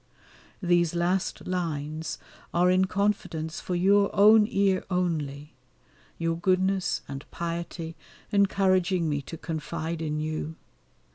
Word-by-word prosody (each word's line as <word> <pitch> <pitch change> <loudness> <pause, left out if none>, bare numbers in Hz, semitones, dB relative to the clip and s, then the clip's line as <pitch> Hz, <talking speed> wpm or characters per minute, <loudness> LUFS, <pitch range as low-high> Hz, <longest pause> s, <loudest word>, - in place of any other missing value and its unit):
These 175 -1 +2
last 180 +2 0
lines 160 -3 -3 0.4
are 180 +1 +4
in 185 +1 +4
confidence 185 -5 -1
for 180 - -3
your 200 +3 +4
own 210 +1 +7
ear 195 -4 +2
only, 155 -5 -2 0.6
your 165 0 0
goodness 185 +1 +1
and 135 0 -6
piety 170 -1 -5 0.4
encouraging 190 -3 +2
me 145 -2 0
to 165 +4 -8
confide 160 +1 -4
in 150 -1 -2
you. 155 +1 -3
175 Hz, 115 wpm, -27 LUFS, 160-190 Hz, 0.6 s, own